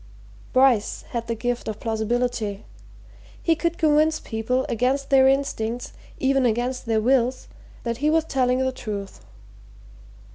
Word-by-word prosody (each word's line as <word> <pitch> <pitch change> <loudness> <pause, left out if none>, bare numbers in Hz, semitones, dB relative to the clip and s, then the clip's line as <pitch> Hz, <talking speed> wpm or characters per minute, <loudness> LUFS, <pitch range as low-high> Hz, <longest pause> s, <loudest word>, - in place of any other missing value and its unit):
Bryce 255 -5 +3
had 235 -1 -3
the 230 - -1
gift 245 +1 -3
of 215 -2 -4
plausibility 225 -2 -2 0.8
he 330 - +3
could 335 +1 -1
convince 310 0 +3
people, 245 +3 -1
against 260 +5 0
their 265 -1 +6
instincts, 245 -4 -1 0.3
even 270 0 +2
against 245 +2 -1
their 225 -1 +2
wills, 255 +2 +1 0.4
that 235 -1 -2
he 295 +4 +1
was 320 +1 +3
telling 255 -4 +1
the 260 0 +1
truth. 205 -5 -6
250 Hz, 135 wpm, -24 LUFS, 225-270 Hz, 0.8 s, their